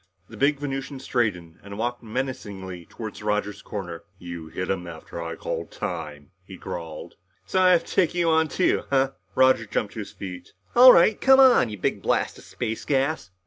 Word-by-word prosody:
The 115 - -11
big 140 +6 +2
Venusian 135 -1 -5
straightened 95 -11 -2
and 100 0 -9
walked 120 +2 -2
menacingly 100 -7 -5
toward 110 -3 -8
Roger's 105 -1 -2
corner. 90 -5 -6
"You 85 -3 -8
hit 90 +3 -3
him 90 -2 -3
after 85 0 -8
I 85 0 -5
called - - -4
time," 80 -6 -6
he 95 0 -11
growled. 80 -3 -7 0.3
"So 185 - +1
I 185 - +6
have 170 - +2
to - - -8
take 180 -3 +2
you 175 -1 +1
on 160 0 +3
too, 180 - +1
huh?" 135 -1 +2 0.2
Roger 130 -4 +4
jumped 105 0 -2
to - - -7
his 105 - -6
feet. 90 -2 -9 0.2
"All 250 +1 +10
right 200 +3 +4
come 265 0 +6
on, 255 - +6
you 105 - -6
big 90 - -1
blast - - 0
of - - -15
space 110 0 -4
gas!" 135 - 0
110 Hz, 190 wpm, -25 LUFS, 90-140 Hz, 0.3 s, All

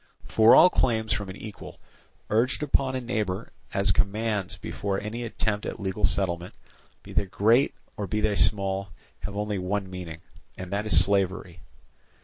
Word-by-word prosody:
For 110 +1 +6
all 180 - +8
claims 110 -3 +1
from 100 -2 -3
an 95 - -7
equal, 105 -2 -10 0.5
urged 120 +7 +1
upon 135 -2 +1
a 130 - -2
neighbour 105 -6 -3 0.2
as 100 0 +2
commands 105 0 0
before 100 -1 -3
any 110 +3 -5
attempt 110 -2 -2
at - - -5
legal 100 +1 -4
settlement, 90 -2 -1 0.5
be - - -11
they 100 - +1
great 115 +8 +3 0.2
or 100 -1 -3
be 105 +4 -1
they 105 -1 +1
small, 100 -1 +1 0.3
have 100 -1 -6
only 105 -1 -1
one 95 +1 -2
meaning, 85 -3 -7 0.4
and 95 +1 -6
that 105 +2 -1
is 85 -3 +5
slavery. 95 -3 -1
100 Hz, 160 wpm, -26 LUFS, 95-110 Hz, 0.5 s, all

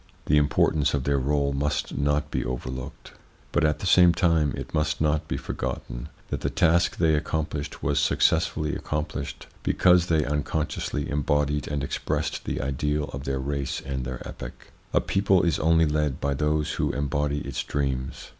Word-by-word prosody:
The 75 - +3
importance 75 0 +2
of 70 - -1
their 70 0 +1
role 70 +1 +1
must 70 +2 -1
not 75 +1 0
be - - -1
overlooked; 65 0 -6 0.4
but, 85 - +2
at 75 -1 +2
the - - -6
same 90 -1 +6
time, 80 -5 +3
it - - -7
must 75 -1 0
not 75 -1 +1
be - - -2
forgotten - - -5 0.2
that - - -3
the - - 0
task 85 +1 +2
they 80 -2 +3
accomplished 75 -1 -2
was - - +2
successfully 80 -2 +2
accomplished 75 -2 -4 0.2
because 90 -1 +4
they 80 -3 +2
unconsciously 75 0 -2
embodied 75 0 0
and 70 -1 -2
expressed - - -2
the - - -2
ideal 75 +2 -1
of 70 0 -6
their 70 -1 -1
race 70 0 -2
and 65 -1 -4
their 65 0 -6
epoch. - - -9 0.2
A - - +3
people 95 -2 +2
is 85 -2 +1
only 80 0 +4
led 75 -3 0
by 70 0 0
those 75 +2 0
who - - 0
embody 70 +1 -1
its 70 -3 -3
dreams. 65 -2 -3
75 Hz, 170 wpm, -26 LUFS, 70-75 Hz, 0.4 s, same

